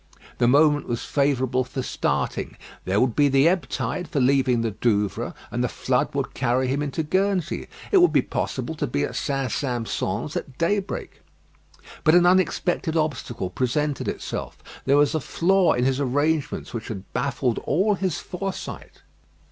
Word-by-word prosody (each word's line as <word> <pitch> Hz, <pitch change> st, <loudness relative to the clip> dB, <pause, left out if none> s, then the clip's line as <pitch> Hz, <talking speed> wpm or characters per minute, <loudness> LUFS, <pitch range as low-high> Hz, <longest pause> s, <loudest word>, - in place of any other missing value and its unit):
The 120 Hz, -, +4 dB
moment 145 Hz, +3 st, +4 dB
was 120 Hz, -1 st, -3 dB
favourable 130 Hz, -3 st, +1 dB
for 130 Hz, +1 st, -5 dB
starting. -, -, -2 dB, 0.3 s
There 95 Hz, +2 st, +1 dB
would 125 Hz, -2 st, +2 dB
be 145 Hz, -1 st, +4 dB
the 135 Hz, +3 st, +4 dB
ebb 180 Hz, +1 st, +1 dB
tide 130 Hz, +7 st, -3 dB
for 150 Hz, -2 st, -1 dB
leaving 130 Hz, -2 st, +3 dB
the 115 Hz, -1 st, -1 dB
Douvres; 105 Hz, -1 st, 0 dB, 0.2 s
and -, -, -1 dB
the -, -, 0 dB
flood -, -, -1 dB
would -, -, -2 dB
carry 130 Hz, +1 st, +1 dB
him 135 Hz, +3 st, 0 dB
into 150 Hz, +2 st, -2 dB
Guernsey. 185 Hz, +1 st, 0 dB, 0.2 s
It 400 Hz, -, +6 dB
would 355 Hz, -, +5 dB
be -, -, +3 dB
possible -, -, -3 dB
to -, -, -1 dB
be -, -, -1 dB
at -, -, -3 dB
St. 135 Hz, -4 st, -1 dB
Sampson's 120 Hz, -5 st, -2 dB
at 130 Hz, -, -5 dB
daybreak. 195 Hz, +4 st, -2 dB, 0.8 s
But 155 Hz, 0 st, +5 dB
an 175 Hz, 0 st, +6 dB
unexpected 175 Hz, -2 st, +2 dB
obstacle 125 Hz, -, -2 dB
presented 140 Hz, +6 st, -1 dB
itself. -, -, -5 dB, 0.2 s
There 140 Hz, +1 st, +4 dB
was 145 Hz, -1 st, +4 dB
a 155 Hz, -, +1 dB
flaw 185 Hz, +5 st, +2 dB
in 125 Hz, -, 0 dB
his 135 Hz, 0 st, +1 dB
arrangements 145 Hz, +2 st, 0 dB
which 115 Hz, -2 st, -5 dB
had 100 Hz, -3 st, -7 dB
baffled 125 Hz, -2 st, 0 dB
all 195 Hz, +8 st, +1 dB
his 190 Hz, -4 st, -1 dB
foresight. 190 Hz, +1 st, -6 dB
140 Hz, 165 wpm, -24 LUFS, 125-165 Hz, 0.8 s, It